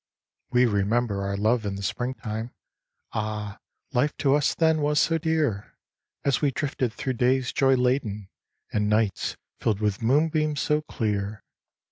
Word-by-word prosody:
"We 125 0 +4
remember 105 0 +1
our 100 0 -2
love 110 +3 +2
in 100 -1 -3
the 100 - -6
spring 125 +7 -2
time— 110 +1 -5 0.6
Ah, 105 -1 -3 0.3
life 135 +4 +1
to 140 -2 +3
us 145 0 +2
then 160 -2 +3
was 150 +1 +2
so 165 0 +2
dear, 155 - -1 0.5
As 140 -1 +2
we 145 - +3
drifted 135 -3 -2
through 130 +3 -3
days 125 +1 +1
joy 135 -1 +4
laden, 125 -6 0 0.5
And 105 0 +1
nights 105 -2 0 0.2
filled 105 -3 0
with 105 -1 0
moonbeams 150 +4 +2
so 150 0 +1
clear. 105 -7 -3
120 Hz, 150 wpm, -26 LUFS, 105-140 Hz, 0.6 s, We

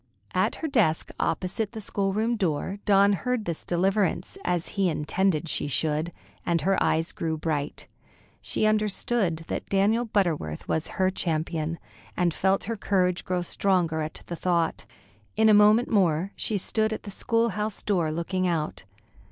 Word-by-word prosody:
At 185 - +1
her 320 - -3
desk 215 - +1
opposite 195 +4 -1
the 220 - -5
schoolroom 205 +3 0
door, 190 0 -1
Dawn 200 0 +5
heard 230 +4 -1
this 170 -2 -4
deliverance, 190 - 0
as 175 -2 -1
he 195 -3 +1
intended 165 +2 0
she 150 - -1
should, 155 +5 0 0.3
and 170 -2 +1
her 195 +4 +1
eyes 160 +1 +1
grew 160 -1 -2
bright. 150 -2 -3 0.6
She - - -1
understood 210 -5 +1
that - - -4
Daniel 210 +5 +2
Butterworth 170 - -1
was 160 - -1
her 185 0 +3
champion, 165 -2 -2 0.4
and 175 -2 +2
felt 190 +3 +1
her 230 - -3
courage 180 -3 +1
grow 180 -1 -1
stronger 175 -3 +1
at 155 +1 -5
the 170 - -5
thought. 170 -1 0 0.5
In 220 0 +4
a - - +7
moment 210 +3 +6
more 185 -3 +2
she 215 - -1
stood 220 +3 0
at 220 - -4
the 200 - -7
school 230 +4 +1
house 210 0 -3
door, 175 -6 +1
looking 185 +3 -1
out. 160 - -2
185 Hz, 160 wpm, -26 LUFS, 165-210 Hz, 0.6 s, a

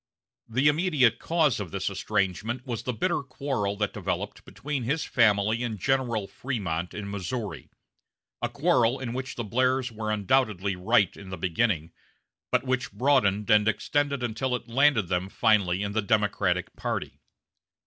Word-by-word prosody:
The 130 +5 +2
immediate 150 - +3
cause 160 -8 +2
of 100 -4 -4
this - - -3
estrangement 105 - -1
was 120 -4 -3
the 125 - -2
bitter 160 +8 0
quarrel 130 -6 -2
that 105 -1 -1
developed - - -4
between 140 0 -4
his 140 +7 -1
family 110 -1 +3
and 115 -3 -2
General 120 -3 0
Frémont 95 -11 -3
in 100 -1 -5
Missouri: 100 -1 -4 0.7
a - - 0
quarrel 135 -5 +2
in 120 -3 -4
which 130 +2 -4
the 120 - -3
Blairs 130 +3 +1
were 110 -1 -4
undoubtedly 105 -3 +1
right 100 +1 +2
in 100 -1 -11
the 95 - -5
beginning, 85 -2 0 0.6
but - - +2
which 130 -2 -1
broadened 110 -7 +2
and 105 0 +5
extended 140 +4 0
until 125 +2 -1
it 120 - -7
landed 125 -4 +3
them 90 +2 -1
finally 100 -4 +2
in 100 - -2
the 110 +2 0
Democratic 100 -4 0
party. - - -4
115 Hz, 155 wpm, -27 LUFS, 100-130 Hz, 0.7 s, and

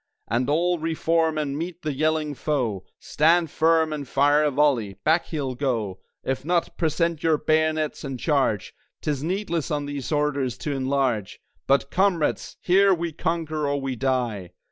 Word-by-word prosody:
And 125 +4 0
all 175 +3 +2
re 160 +1 -2
form 160 -1 +1
and 145 -2 -2
meet 170 +3 -5
the 155 -1 -1
yelling 155 +1 0
foe! 125 -10 -1
Stand 165 +1 +2
firm 160 -1 +3
and 145 -3 -5
fire 145 +3 +3
a 150 - +3
volley! 130 -8 +1
Back 160 +2 +2
he'll 140 -5 -3
go. 115 -8 -2 0.2
If 135 0 -2
not, 170 +2 0
present 165 0 0
your 160 -2 +3
bayonets, 155 0 0
and 135 -3 -5
Charge! 135 - 0 0.3
'Tis 145 -3 -1
needless 170 -2 -2
on 145 -2 -1
these 145 -1 -5
orders 140 -5 0
to 150 - -4
enlarge; 130 -6 -1 0.3
But 140 0 +2
Comrades! 185 -4 0
here 195 +1 +4
we 170 0 -3
conquer 155 -1 -2
or 140 0 0
we 135 -1 -3
die!" 120 -8 -1
150 Hz, 165 wpm, -24 LUFS, 135-160 Hz, 0.3 s, here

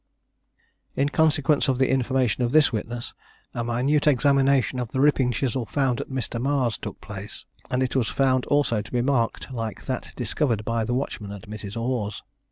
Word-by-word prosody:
In 140 +1 +1
consequence 150 -1 +2
of 130 -2 +2
the 130 0 +2
information 130 -3 +1
of 120 - 0
this 155 -4 +5
witness, 120 +2 -4 0.4
a 120 - -2
minute 130 +6 +1
examination 140 -2 +3
of 120 -2 -3
the 130 - -3
ripping 135 -3 +3
chisel 125 0 -1
found 135 -4 0
at - - -8
Mr. 125 -3 -2
Marr's 130 -4 +1
took - - -7
place, - - -8 0.2
and 130 +1 +1
it 130 - -2
was 125 -4 +2
found 130 -2 +1
also 145 -7 +2
to 105 - -12
be 120 -1 +1
marked 130 -1 0
like 115 -3 -5
that 130 -2 -4
discovered 120 -2 -1
by 115 -1 0
the 120 +2 -1
watchman 115 -6 -3
at 100 0 -8
Mrs. 105 +1 -6
Orr's. 115 -4 -2
125 Hz, 180 wpm, -25 LUFS, 115-135 Hz, 0.4 s, this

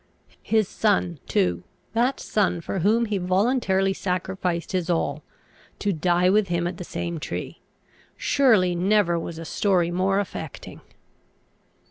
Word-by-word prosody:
His 220 -3 +1
son, 185 -7 0
too, 90 -1 +1 0.3
that 245 +4 +1
son 195 -4 0
for 185 +3 -4
whom 220 +6 +3
he 210 -3 -1
voluntarily 195 +1 +1
sacrificed 180 -2 -2
his 180 -2 -1
all, 160 -3 0 0.6
to 205 -1 0
die 175 +2 +2
with 205 +2 +3
him 170 -1 -1
at 175 0 -3
the 180 - -6
same 170 -1 -4
tree; - - -6 0.6
surely 220 -11 +3
never 180 -1 +2
was 165 0 -6
a 165 - -7
story 180 -2 +1
more 190 +2 +1
affecting! 205 - -6
185 Hz, 135 wpm, -24 LUFS, 175-205 Hz, 0.6 s, whom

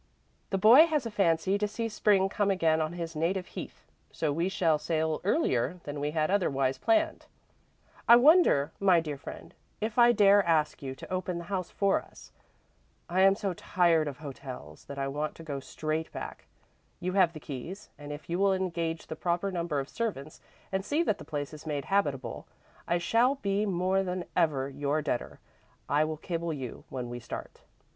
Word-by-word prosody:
The 195 - 0
boy 240 - +8
has 300 -6 0
a 230 - -4
fancy 190 0 +2
to 210 - +1
see 225 +2 -3
Spring 205 -3 +3
come 200 0 0
again 165 -4 +2
on 155 +1 -2
his 165 -2 -5
native 180 +4 0
heath, - - -9 0.3
so 155 -3 -1
we 170 +5 0
shall 165 -5 +2
sail 160 -1 -1
earlier 180 - +1
than 145 0 -5
we 145 +1 -1
had 155 +2 0
otherwise 135 -9 +1
planned. 325 -1 +1 0.8
"'I 235 - +10
wonder, 245 - +5
my 190 -3 +5
dear 150 -3 -4
friend, - - -9 0.3
if 220 +2 -2
I 240 0 +8
dare 205 -2 +5
ask 160 -3 +1
you 135 -1 -5
to 185 - -8
open 185 -1 -2
the 170 - -5
house 185 -2 -2
for 200 -1 +1
us? - - -16 0.8
I 185 +2 +2
am 195 0 +6
so 195 -2 -2
tired 170 -2 +2
of 140 -3 -5
hotels 130 - -9
that 140 - -8
I 135 0 -1
want 150 +2 -3
to 165 - -11
go 145 -3 -4
straight 155 +3 -3
back. - - -8 0.5
You 185 +1 -2
have 185 -4 +4
the 155 - -8
keys 155 +9 -8
and 145 0 -9
if 145 +1 -8
you 175 +2 -2
will 195 -1 +4
engage 170 -3 -2
the - - -6
proper 175 +4 -1
number 170 -5 -1
of 135 - -4
servants 155 - -4 0.3
and 190 0 -1
see 295 - +1
that 215 - 0
the - - -9
place 145 -1 -4
is 155 +1 -10
made 145 -3 -2
habitable, 145 -10 -1 0.4
I 175 - +2
shall 235 +9 +2
be 205 -4 -1
more 185 +1 +1
than 180 -1 -3
ever 150 -6 +2
your 145 +2 -1
debtor. 125 - -3 0.5
I 150 +2 +3
will 155 0 -4
cable 170 +1 -3
you 130 -5 -7
when 125 -2 -4
we 120 0 -6
start. 115 - -8
170 Hz, 195 wpm, -29 LUFS, 150-195 Hz, 0.8 s, I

